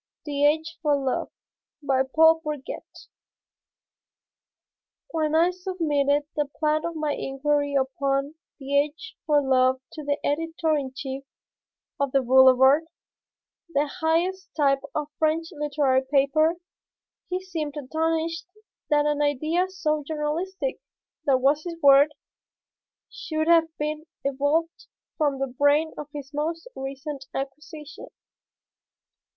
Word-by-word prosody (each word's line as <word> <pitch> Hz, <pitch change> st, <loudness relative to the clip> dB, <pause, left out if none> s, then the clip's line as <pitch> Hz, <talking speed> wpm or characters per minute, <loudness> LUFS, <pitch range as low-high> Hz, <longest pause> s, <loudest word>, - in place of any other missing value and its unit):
THE 290 Hz, -1 st, +2 dB
AGE 320 Hz, +2 st, -1 dB
FOR 300 Hz, -3 st, +3 dB
LOVE 270 Hz, -2 st, -1 dB, 0.5 s
BY 270 Hz, -2 st, +2 dB
PAUL 320 Hz, 0 st, +6 dB
BOURGET 300 Hz, -3 st, -7 dB, 2.1 s
When 315 Hz, -1 st, 0 dB
I 340 Hz, +3 st, +4 dB
submitted 310 Hz, -6 st, 0 dB
the 295 Hz, -1 st, 0 dB
plan 310 Hz, 0 st, +1 dB
of 335 Hz, 0 st, -4 dB
my 305 Hz, -2 st, -1 dB
Inquiry 285 Hz, +1 st, -1 dB
Upon 275 Hz, +1 st, 0 dB, 0.2 s
the 280 Hz, 0 st, +1 dB
Age 300 Hz, +10 st, -4 dB
for 295 Hz, -2 st, +4 dB
Love 260 Hz, -1 st, +3 dB
to 305 Hz, -, -7 dB
the 285 Hz, 0 st, 0 dB
editor 325 Hz, +1 st, 0 dB
in 275 Hz, -3 st, -2 dB
chief 270 Hz, 0 st, -5 dB, 0.8 s
of 280 Hz, -2 st, -1 dB
the 270 Hz, -1 st, +3 dB
Boulevard, 265 Hz, +4 st, +6 dB, 0.9 s
the 285 Hz, +1 st, +3 dB
highest 350 Hz, +4 st, -1 dB
type 275 Hz, -2 st, +3 dB
of 300 Hz, -1 st, -2 dB
French 320 Hz, +1 st, +1 dB
literary 290 Hz, -4 st, +1 dB
paper, 310 Hz, +4 st, +3 dB, 0.7 s
he 365 Hz, 0 st, -1 dB
seemed 320 Hz, -6 st, -5 dB
astonished 320 Hz, +4 st, -2 dB, 0.4 s
that 295 Hz, -1 st, +3 dB
an 295 Hz, 0 st, +1 dB
idea 310 Hz, +6 st, +1 dB
so 305 Hz, -5 st, -1 dB
journalistic 325 Hz, -, -3 dB, 0.4 s
that 265 Hz, -2 st, +3 dB
was 290 Hz, +3 st, +3 dB
his 345 Hz, -2 st, -5 dB
word 285 Hz, 0 st, +6 dB, 1.0 s
should 315 Hz, -1 st, -3 dB
have 335 Hz, -1 st, +5 dB
been 305 Hz, +1 st, -3 dB, 0.2 s
evolved 285 Hz, +5 st, -1 dB, 0.3 s
from 290 Hz, -3 st, +1 dB
the 270 Hz, -, 0 dB
brain 285 Hz, +4 st, +2 dB
of 300 Hz, -, -7 dB
his 290 Hz, -1 st, -8 dB
most 325 Hz, +6 st, -3 dB
recent 270 Hz, +1 st, -6 dB
acquisition. 300 Hz, +3 st, -7 dB
295 Hz, 120 wpm, -25 LUFS, 280-320 Hz, 2.1 s, PAUL